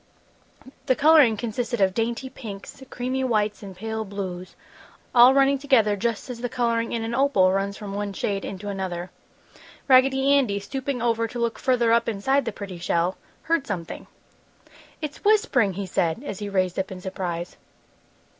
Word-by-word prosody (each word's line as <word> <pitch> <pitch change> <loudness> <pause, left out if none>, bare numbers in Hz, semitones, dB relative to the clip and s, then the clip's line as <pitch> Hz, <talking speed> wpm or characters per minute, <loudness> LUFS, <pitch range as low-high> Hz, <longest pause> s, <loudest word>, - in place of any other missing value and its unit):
The 260 - +4
coloring 290 -7 +5
consisted 235 +1 -3
of 190 -1 +3
dainty 230 +3 -2
pinks, 220 -4 -9
creamy 255 +2 -2
whites 215 -4 0
and 195 -2 -9
pale 220 +3 -4
blues, 190 -3 -6 0.6
all 245 +1 +8
running 275 0 +4
together 245 -7 +3
just 225 +1 -2
as 245 -2 -7
the 245 - -2
coloring 230 -1 0
in 230 -1 -2
an 225 +1 -3
opal 240 -8 +3
runs 195 +1 -1
from 205 -2 -7
one 205 0 -3
shade 195 0 -2
into 195 +1 -6
another. 185 -3 -4 0.8
Raggedy 265 +1 +5
Andy, 245 -8 +2
stooping 260 +3 -4
over 230 -1 +1
to 240 - -8
look 235 -1 -1
further 245 -3 +2
up 235 0 +2
inside 265 +7 +1
the 230 - -2
pretty 195 -4 -8
shell, 170 +1 0 0.3
heard 330 -4 0
something. 180 -6 -5 1.0
"It's 300 -1 -6
whispering!" 410 - +3
he 195 +2 -4
said, 175 - -1
as 205 -9 -6
he 205 -1 -4
raised 185 -2 0
up 190 - -3
in 185 - -7
surprise. 180 -2 -5
225 Hz, 165 wpm, -24 LUFS, 195-255 Hz, 1.0 s, all